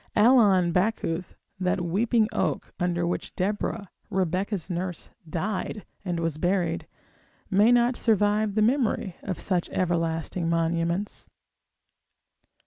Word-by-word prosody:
Allon 210 -6 +5
Backuth, 180 -2 -1 0.2
that 185 0 0
weeping 215 +6 +2
oak, - - -1
under 175 -1 0
which 175 - -3
Deborah, 205 +1 -2 0.2
Rebecca's 190 -1 -1
nurse, 180 -1 -4 0.2
died, 195 +4 -3 0.2
and 175 -3 -2
was 165 -2 -2
buried, 175 -2 0 0.6
may 205 +5 +5
not 245 +1 +4
survive 210 -1 +2
the 215 - +3
memory 225 -6 +1
of 185 -3 -4
such 180 -3 0
everlasting 165 -1 -1
monuments. 170 +3 -1
185 Hz, 110 wpm, -26 LUFS, 170-210 Hz, 0.6 s, Allon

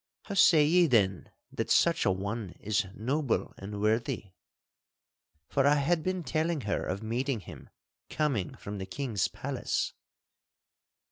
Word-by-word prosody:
How 200 - -6
say 165 -6 +6
ye 175 +3 +5
then 100 - +2 0.2
that - - -3
such - - +3
an 95 - +2
one 100 0 -4
is 105 0 0
noble 135 +4 -1
and 100 +1 -6
worthy?' 110 -2 0 1.2
For 140 0 +2
I 145 - +5
had 160 +4 +1
been 185 +1 -2
telling 155 +2 0
her 105 -3 -1
of 100 +4 -3
meeting 120 +1 -1
him - - -12 0.4
coming 135 - -1
from 100 0 -7
the 95 - -5
king's 120 -9 -1
palace. - - -2
120 Hz, 140 wpm, -29 LUFS, 100-150 Hz, 1.2 s, say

